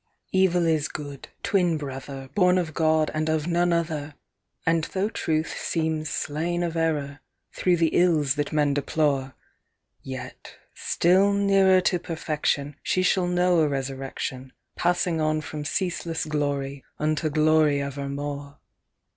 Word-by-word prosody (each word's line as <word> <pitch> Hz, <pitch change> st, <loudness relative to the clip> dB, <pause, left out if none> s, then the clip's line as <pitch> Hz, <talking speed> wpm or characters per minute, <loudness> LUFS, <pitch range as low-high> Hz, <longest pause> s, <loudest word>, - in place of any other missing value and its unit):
" -, -, -44 dB
Evil 175 Hz, -2 st, +3 dB
is 155 Hz, -3 st, +2 dB
of -, -, -15 dB
Good, 145 Hz, -2 st, -7 dB, 0.2 s
twin 180 Hz, -5 st, +2 dB
brother, 135 Hz, -1 st, -7 dB
Born 180 Hz, -2 st, +4 dB
of 170 Hz, -4 st, -1 dB
God, 155 Hz, -1 st, +2 dB
and 155 Hz, 0 st, -1 dB
of 155 Hz, -1 st, 0 dB
none 175 Hz, 0 st, +2 dB
other: 155 Hz, -3 st, -1 dB, 0.5 s
And 165 Hz, -1 st, +2 dB
though 195 Hz, +2 st, -1 dB
Truth 160 Hz, -6 st, -1 dB
seems 160 Hz, -2 st, -1 dB
slain 170 Hz, +4 st, -2 dB
of 170 Hz, -1 st, -2 dB
Error, 150 Hz, -3 st, -1 dB, 0.3 s
through 180 Hz, -1 st, +2 dB
the 165 Hz, -1 st, +3 dB
ills 155 Hz, -7 st, +3 dB
that 145 Hz, 0 st, -2 dB
men 150 Hz, -2 st, +2 dB
deplore, 140 Hz, -2 st, 0 dB, 0.7 s
Yet, 130 Hz, -1 st, -8 dB, 0.2 s
still 190 Hz, +4 st, +3 dB
nearer 195 Hz, -2 st, +4 dB
to 180 Hz, 0 st, +1 dB
perfection, 150 Hz, -3 st, -2 dB
She 185 Hz, -, 0 dB
shall 185 Hz, -1 st, +2 dB
know 180 Hz, 0 st, +3 dB
a 155 Hz, -, +4 dB
resurrection, 135 Hz, -1 st, -4 dB, 0.2 s
Passing 175 Hz, -1 st, +1 dB
on 155 Hz, 0 st, +1 dB
from 150 Hz, -1 st, -6 dB
ceaseless 170 Hz, -1 st, -2 dB
glory, 140 Hz, -2 st, -2 dB
unto 155 Hz, +1 st, 0 dB
glory 155 Hz, -1 st, +3 dB
ever 140 Hz, 0 st, -4 dB
more. 145 Hz, 0 st, -5 dB
155 Hz, 145 wpm, -25 LUFS, 145-175 Hz, 0.7 s, Born